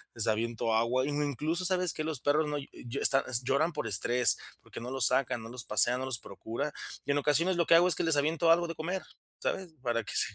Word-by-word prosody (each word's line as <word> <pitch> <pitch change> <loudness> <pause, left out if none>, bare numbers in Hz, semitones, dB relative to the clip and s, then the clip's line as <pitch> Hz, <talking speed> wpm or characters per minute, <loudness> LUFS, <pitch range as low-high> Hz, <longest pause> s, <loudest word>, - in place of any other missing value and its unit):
les 115 -2 +1
aviento 115 +1 -1
agua. 120 +4 +1
Incluso, 150 +4 -2
¿sabes 180 -2 +1
qué? 155 - -4
Los 155 -4 -3
perros 150 +2 +1
no, 150 0 -2 0.4
están, 135 0 +5
est 125 -1 +2
lloran 155 +6 +1
por 150 - -4
estrés, 120 +5 +2 0.2
porque - - -10
no 125 +2 -6
los 130 -4 +3
sacan, 125 -2 0
no 115 - -9
los 125 0 -3
pasean, 120 +4 +3
no - - -3
los 130 -3 +3
procuran. 115 +9 -5 0.3
Y 145 - 0
en 140 - +1
ocasiones 160 +6 +2
lo 170 - +2
que - - +5
hago 175 +2 +5
es 180 - +2
que - - -2
les 165 -2 +2
aviento 160 +3 +2
algo 170 +1 +3
de 165 - -6
comer, 180 +5 -3 0.4
¿sabes? 185 -3 -3
Para 120 -2 -1
que - - -8
se, - - +2
145 Hz, 240 wpm, -30 LUFS, 120-165 Hz, 0.4 s, están